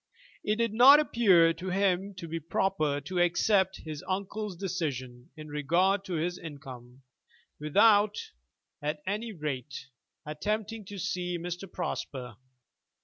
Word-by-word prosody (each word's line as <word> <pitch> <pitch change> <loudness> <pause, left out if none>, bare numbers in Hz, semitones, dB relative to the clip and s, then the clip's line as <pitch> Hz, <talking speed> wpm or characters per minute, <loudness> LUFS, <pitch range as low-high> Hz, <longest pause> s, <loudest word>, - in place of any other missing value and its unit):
It 210 - +1
did 230 -1 0
not 265 +6 +9
appear 190 - +4
to 180 +3 -6
him 195 +1 0
to 175 -2 -7
be 165 +1 -4
proper 155 -3 0
to 180 +5 -3
accept 190 +2 +2
his 155 -2 -6
uncle's 200 +1 -3
decision 140 -10 -4
in 155 0 -9
regard 175 +7 +1
to 190 - -5
his 175 +2 -2
income, 130 -4 -10 0.6
without, 205 +7 +4 0.6
at 150 +1 -3
any 210 +4 -3
rate, 140 - -5 0.4
attempting 210 +7 -3
to 200 +1 -8
see 180 -2 -2
Mr. 175 +2 -6
Prosper. 125 -5 -5
180 Hz, 130 wpm, -29 LUFS, 150-200 Hz, 0.6 s, not